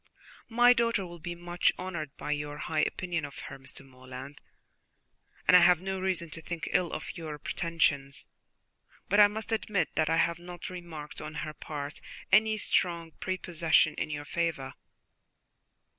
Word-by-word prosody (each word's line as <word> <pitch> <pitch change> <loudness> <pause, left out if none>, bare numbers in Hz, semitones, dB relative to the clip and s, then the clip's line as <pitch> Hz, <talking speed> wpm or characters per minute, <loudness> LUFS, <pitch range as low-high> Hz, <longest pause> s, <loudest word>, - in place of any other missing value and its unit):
"My 240 +1 +7
daughter 230 -4 +1
will 175 -1 -9
be 175 +2 -5
much 175 0 +1
honoured 170 -6 -5
by - - -4
your 145 0 -2
high 155 +1 -2
opinion 175 +1 0
of 140 -1 -7
her, 135 - -8
Mr. 135 0 -8
Morland, 130 +2 -10 1.1
and - - +8
I - - +11
have 175 -1 +6
no 190 +1 -3
reason 180 -3 -1
to 165 - -5
think 170 +1 -5
ill 180 -2 +2
of - - -5
your 155 -2 -5
pretensions; 145 -4 0 0.8
but 205 +2 +4
I 205 - +10
must 220 +2 -5
admit 215 -3 +1
that 155 0 +1
I 165 - +3
have 170 0 +2
not 175 0 -8
remarked 170 -4 -7
on 155 0 -7
her 155 - -6
part 145 -1 -6 0.3
any 220 +1 +5
strong 170 -5 +1
prepossession 170 -4 +2
in - - -3
your 145 -1 -4
favour." 155 -6 -1
170 Hz, 160 wpm, -30 LUFS, 150-185 Hz, 1.1 s, I